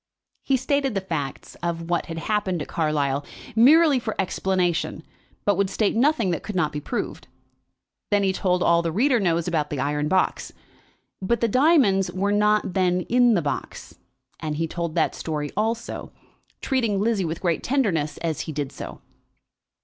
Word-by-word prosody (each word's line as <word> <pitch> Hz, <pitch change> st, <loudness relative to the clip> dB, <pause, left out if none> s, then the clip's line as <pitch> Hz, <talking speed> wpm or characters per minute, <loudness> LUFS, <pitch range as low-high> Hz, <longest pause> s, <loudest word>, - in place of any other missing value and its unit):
He 270 Hz, -, +1 dB
stated 270 Hz, -1 st, 0 dB
the 195 Hz, -, 0 dB
facts 155 Hz, -8 st, -5 dB
of 170 Hz, 0 st, -3 dB
what 175 Hz, -, 0 dB
had 165 Hz, -, -6 dB
happened 190 Hz, 0 st, -1 dB
at -, -, -10 dB
Carlisle, 145 Hz, -3 st, 0 dB, 0.3 s
merely 290 Hz, +4 st, +6 dB
for 220 Hz, -2 st, -4 dB
explanation, 180 Hz, -4 st, -1 dB, 0.4 s
but 205 Hz, -3 st, +2 dB
would 200 Hz, -1 st, +1 dB
state 205 Hz, +2 st, 0 dB
nothing 240 Hz, -5 st, +2 dB
that 170 Hz, -, -2 dB
could 210 Hz, -, -6 dB
not 155 Hz, -4 st, +1 dB
be 150 Hz, -, -5 dB
proved. 240 Hz, -, -4 dB, 0.8 s
Then 205 Hz, -1 st, +2 dB
he 190 Hz, -1 st, +2 dB
told 180 Hz, -2 st, +1 dB
all 170 Hz, 0 st, +4 dB
that 170 Hz, -, -2 dB
the -, -, -1 dB
reader 245 Hz, -, +2 dB
knows 170 Hz, -4 st, +1 dB
about 155 Hz, -4 st, 0 dB
the 145 Hz, -, -3 dB
iron 145 Hz, +2 st, 0 dB
box. 185 Hz, +4 st, 0 dB, 0.7 s
But 235 Hz, +5 st, 0 dB
the 230 Hz, -, +2 dB
diamonds 230 Hz, -, +3 dB
were 195 Hz, +3 st, -1 dB
not 210 Hz, -2 st, +2 dB
then 180 Hz, -1 st, +2 dB
in 245 Hz, -1 st, +4 dB
the 175 Hz, -, +1 dB
box, 145 Hz, -, -5 dB, 0.4 s
and 155 Hz, -1 st, -3 dB
he 165 Hz, +2 st, -1 dB
told 170 Hz, -1 st, -4 dB
that -, -, +2 dB
story 150 Hz, -2 st, -4 dB
also, 225 Hz, +3 st, -2 dB, 0.5 s
treating 230 Hz, -7 st, 0 dB
Lizzie 215 Hz, -1 st, +1 dB
with 165 Hz, 0 st, -3 dB
great 170 Hz, -3 st, 0 dB
tenderness 175 Hz, -, 0 dB
as 160 Hz, -3 st, -1 dB
he -, -, -5 dB
did 145 Hz, -2 st, -3 dB
so. -, -, -8 dB
185 Hz, 175 wpm, -24 LUFS, 160-220 Hz, 0.8 s, merely